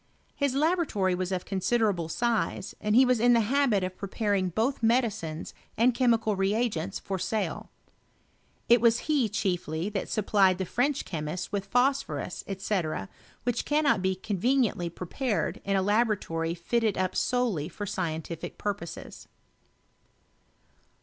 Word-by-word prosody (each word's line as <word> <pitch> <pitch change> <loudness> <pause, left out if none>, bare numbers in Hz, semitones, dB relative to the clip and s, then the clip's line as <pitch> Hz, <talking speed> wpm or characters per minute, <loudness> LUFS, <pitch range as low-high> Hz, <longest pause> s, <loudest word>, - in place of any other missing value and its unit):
His 280 -2 0
laboratory 295 - +1
was 185 +1 -2
of 185 -1 -2
considerable 195 -3 0
size, 230 0 -1
and 210 0 +1
he 260 +2 +7
was 250 -2 +2
in 245 +2 +5
the 235 - +5
habit 235 -3 +2
of 185 0 -3
pre 200 - -5
paring 200 -3 0
both 230 - -1
medicines 220 -9 0 0.2
and 240 +3 +4
chemical 230 -4 +2
reagents 195 -2 0
for 190 -2 -4
sale. 215 +3 -2 1.0
It 240 -1 +6
was 235 0 +4
he 285 -8 +2
chiefly 180 -4 -1
that 200 -2 -3
supplied 195 -3 +3
the 190 - -2
French 270 +9 0
chemists 160 +2 -4
with 200 -1 -2
phosphorus, 245 - 0
Sec, 170 - -2 0.3
which 245 0 0
cannot 295 -7 +2
be 190 0 +1
conveniently 205 -1 0
prepared 180 - -2
in 200 0 0
a 190 - +2
laboratory 200 -6 0
fitted 220 +4 0
up 185 0 -1
solely 230 - 0
for 205 +4 -6
scientific 165 -3 -4
purposes. 195 -5 -5
205 Hz, 135 wpm, -28 LUFS, 185-240 Hz, 1.0 s, he